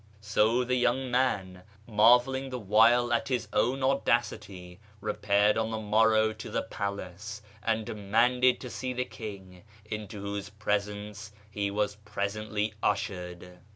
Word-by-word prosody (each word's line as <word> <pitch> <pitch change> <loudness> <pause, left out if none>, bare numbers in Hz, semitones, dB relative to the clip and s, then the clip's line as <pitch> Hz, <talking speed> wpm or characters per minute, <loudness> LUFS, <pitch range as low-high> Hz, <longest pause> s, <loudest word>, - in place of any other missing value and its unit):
So 110 +3 +2
the 125 +1 -1
young 125 +1 +1
man, 95 -8 0 0.2
mar 115 +2 +6
velling 135 +1 -4
the 125 - -4
while 115 +3 +4
at 120 - +1
his 125 -4 -1
own 125 +5 +1
audacity, 105 -9 -1 0.2
repaired 105 0 +2
on 110 0 0
the 110 - -3
morrow 110 +1 +3
to 110 - -8
the - - -1
palace, 100 +2 -5 0.2
and 110 0 0
demanded 120 +5 +2
to 125 - -6
see 130 0 -3
the 125 0 -1
king, 95 -6 -9 0.2
into 105 -1 -6
whose 100 0 -4
presence 105 0 -3 0.2
he 100 -1 -1
was 105 0 -1
presently 105 +1 -3
ushered. 90 -3 -3
105 Hz, 140 wpm, -29 LUFS, 100-120 Hz, 0.2 s, mar